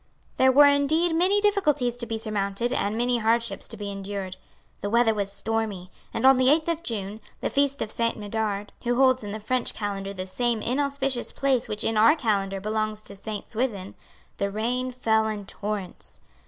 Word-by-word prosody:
There 260 0 +5
were 290 +3 +8
indeed 305 +4 +3
many 370 +5 +4
difficulties 300 - +2
to 235 -1 -3
be 225 0 -2
surmounted 215 +2 -2
and 210 -3 -1
many 240 0 +1
hardships 230 +1 0
to 225 - -8
be 205 -1 -5
endured. 195 -1 -5 0.4
The 205 - -3
weather 230 0 +4
was 200 -2 -2
stormy; 205 -3 -3 0.2
and, - - -1
on 265 0 +7
the 255 0 +4
eighth 310 +2 +3
of 335 -1 -1
June, 215 - -4 0.2
the - - -2
feast 280 -2 +1
of 215 - -7
Saint 230 0 -1
Medard, 205 -1 -3
who 245 0 +1
holds 255 -1 +4
in 205 - -5
the 215 - -5
French 250 +3 -1
Calendar 200 -2 -3
the 185 0 -4
same 230 +3 -1
inauspicious 275 -1 -1
place 265 -3 0
which 210 - -2
in 225 - 0
our 225 +9 +6
Calendar 200 -8 0
belongs 215 +1 -2
to 200 - -6
Saint 210 +1 -7
Swithin, 215 -5 -2 0.4
the 200 - 0
rain 245 +5 -1
fell 220 -3 +1
in 210 -2 -4
torrents. 205 -2 -6
225 Hz, 190 wpm, -25 LUFS, 205-260 Hz, 0.4 s, were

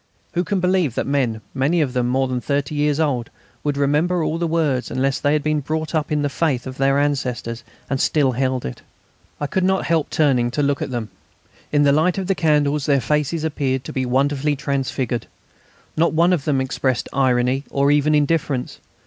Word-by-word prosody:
Who 175 +1 +1
can 195 +1 -1
believe 180 -8 +1
that - - -1
men, 125 -6 0
many 140 +6 +1
of 140 -5 0
them 125 -2 0
more 130 +2 +1
than 125 -1 -2
thirty 140 +1 -1
years 150 0 +1
old, 130 -7 0 0.3
would 145 -1 -1
remember 155 +5 +1
all 160 +1 -1
the 170 - 0
words 155 -6 0
unless 135 +1 0
they 145 - +1
had 150 -1 +1
been 155 0 +1
brought 155 +3 -3
up 155 -1 -1
in 150 -1 +1
the - - +2
faith 140 -3 -1
of 130 0 -7
their 135 0 +3
ancestors 125 -5 -1 0.2
and 135 -1 -1
still 145 -4 +2
held 130 0 -1
it? 60 - -6 0.6
I 145 - -1
could 185 +6 -1
not 190 +1 +1
help 165 -2 +1
turning 130 -6 +2
to 145 +5 -1
look 140 0 0
at - - -2
them. 120 -4 -4 0.6
In 145 -1 +3
the 140 - +5
light 160 +6 +2
of 190 - -2
the 195 - +1
candles 150 -4 +1
their 140 -2 +4
faces 150 +4 -1
appeared 135 -4 -1
to - - -7
be 130 -1 -1
wonderfully 140 +3 +1
transfigured. 130 -4 -2 0.7
Not 165 +2 +2
one 170 +3 +4
of 155 -6 -1
them 140 -3 +1
expressed 130 -1 -1
irony 130 0 +2
or 140 +1 +2
even 150 +1 +3
indifference. 145 -3 0
145 Hz, 205 wpm, -21 LUFS, 130-155 Hz, 0.7 s, the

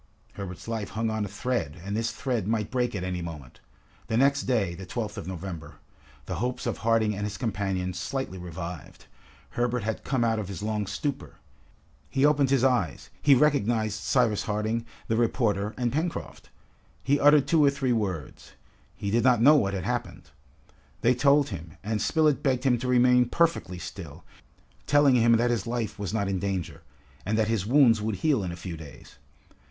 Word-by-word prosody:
Herbert's 95 0 -8
life 110 -3 -3
hung 110 +1 -2
on 110 -1 -1
a - - -4
thread, 100 - -3
and 100 +1 -3
this 115 +1 -1
thread 125 -7 -2
might 110 -2 -1
break 125 -2 0
at 90 - -3
any 90 -1 -3
moment. 75 -7 -8 0.5
The 110 - 0
next 140 +2 +3
day, 110 -9 +1
the 90 +2 -9
12th 105 0 -4
of 85 - -7
November, 90 -3 -7 0.5
the - - -4
hopes 125 +1 -3
of - - -2
Harding 115 -2 +2
and 105 - -4
his 105 -1 -4
companions 95 -5 -2
slightly 95 -2 -4
revived. 90 -2 -8 0.5
Herbert 120 -1 -1
had 110 0 -3
come 130 -3 0
out 115 -1 +1
of 105 - -4
his 100 0 -6
long 105 -2 -2
stupor. 140 +8 -4 0.7
He 135 +1 +2
opened 145 -2 +3
his 135 -2 +2
eyes, 120 - 0
he 140 -2 +6
recognized 115 -6 +1
Cyrus 120 -5 +2
Harding, 110 +2 -2 0.2
the 110 - 0
reporter, 110 -3 0
and 120 -1 -1
Pencroft. 165 +3 -4 0.5
He 140 +2 +2
uttered 145 -1 +6
two 160 -3 +4
or 140 - +6
three 135 -3 0
words. 95 - -4 0.4
He 100 - -4
did 115 +2 +2
not 125 -2 +4
know 140 +6 +7
what 100 -9 +1
had 95 - -3
happened. 70 - -4 0.7
They 120 - +4
told 140 +3 +3
him, 85 -5 -8
and 105 0 -2
Spilett 155 -1 +2
begged 130 -3 0
him 125 -3 +2
to 130 - -4
remain 125 0 +4
perfectly 165 - +1
still, 85 -2 -9 0.6
telling 145 -2 +5
him 115 -1 +5
that 120 +1 +3
his 115 -4 -1
life 115 -3 -3
was 100 -3 -3
not 105 -2 -1
in 95 -1 -1
danger, 95 -3 -3 0.4
and 105 +4 -1
that 110 -1 +1
his 105 -3 -1
wounds 120 -4 +5
would 110 -1 -1
heal 135 - +1
in 90 - -3
a - - -6
few 85 0 -7
days. 75 -3 -13
110 Hz, 190 wpm, -27 LUFS, 95-125 Hz, 0.7 s, know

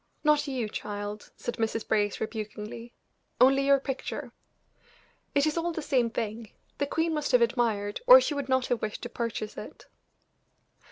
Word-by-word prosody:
"Not 300 -1 +3
you, 255 -5 -2
child," 205 0 -6
said 240 - -4
Mrs. 225 0 -1
Brace, 205 -2 +1
rebukingly 215 +1 -6 0.5
"only 270 +2 +5
your 280 0 +6
picture." 270 -1 -5 1.0
"It 280 +1 +4
is 310 +2 0
all 345 +1 -1
the 320 -1 -4
same 250 -5 +2
thing; 225 -1 -4 0.3
the 285 - 0
queen 325 +3 0
must 300 -3 -1
have 250 - +6
admired, 225 -4 0
or - - +11
she 415 - -1
would 280 -2 -4
not 260 -1 +2
have 245 - -1
wished 215 -1 -4
to 240 - -4
purchase 230 -3 -4
it." - - -9
240 Hz, 165 wpm, -28 LUFS, 215-280 Hz, 1.0 s, or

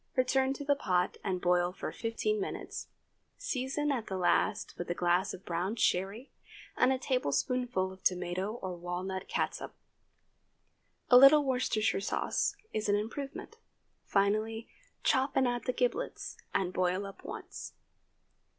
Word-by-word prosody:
Return 265 +1 +2
to 285 +1 -7
the 285 - +4
pot 180 -10 0
and 185 -2 -1
boil 180 0 +2
for 185 - -5
fifteen 405 - -1
minutes; 390 - -5 0.5
season 270 +3 -1
at 245 -5 -2
the 190 - -3
last 180 - +1
with 175 - -6
a 175 - 0
glass 180 +3 +2
of 190 - -9
brown 180 +5 -1
sherry 205 +4 0 0.4
and 255 - +4
a 265 - +2
tablespoonful 250 - 0
of 190 0 -17
tomato 180 +3 0
or 185 -1 -3
walnut 180 +2 -4
catsup. - - -2 1.4
A 250 - +10
little 280 +3 +8
Worcestershire 250 -6 +1
sauce 200 - 0 0.2
is 215 -1 -1
an 205 - +4
improvement. 275 - -5 0.5
Finally, 215 +3 +1 0.4
chop 265 +1 +2
and 265 -1 +4
add 245 0 -2
the 250 - +1
giblets, 255 - -2 0.2
and 185 -1 0
boil 185 +2 +1
up 195 - -10
once. - - -7
215 Hz, 140 wpm, -31 LUFS, 185-260 Hz, 1.4 s, A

